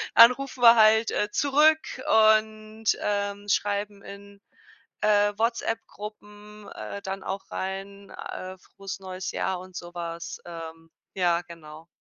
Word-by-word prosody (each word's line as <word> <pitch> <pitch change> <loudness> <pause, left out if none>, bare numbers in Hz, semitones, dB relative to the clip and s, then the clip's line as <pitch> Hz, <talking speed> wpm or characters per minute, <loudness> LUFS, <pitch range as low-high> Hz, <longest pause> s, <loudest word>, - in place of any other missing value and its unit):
Dann 230 +2 +10
rufen 265 -2 -7
wir 235 0 +9
halt, 220 +1 +5
äh, 210 +1 -1
zurück 300 +3 +4 0.6
und, 215 0 -13 0.2
ähm, 205 0 -2
schreiben 205 0 -1
in, 200 0 -12 0.6
äh, 205 -1 +3
WhatsApp-Gruppen, 210 -2 -5
äh, 200 - -7
dann 190 0 -5
auch 195 +1 -6
rein, 195 +1 -6
äh: 185 0 -7
„Frohes 195 0 -9
neues 185 0 -6
Jahr" 190 -1 -2
und 185 -1 -14
so 175 0 -9
was. 170 -1 -6
Ähm, 165 -1 -9 0.3
ja, 175 -2 +2
genau. 160 -1 -12
200 Hz, 130 wpm, -26 LUFS, 185-215 Hz, 0.6 s, Dann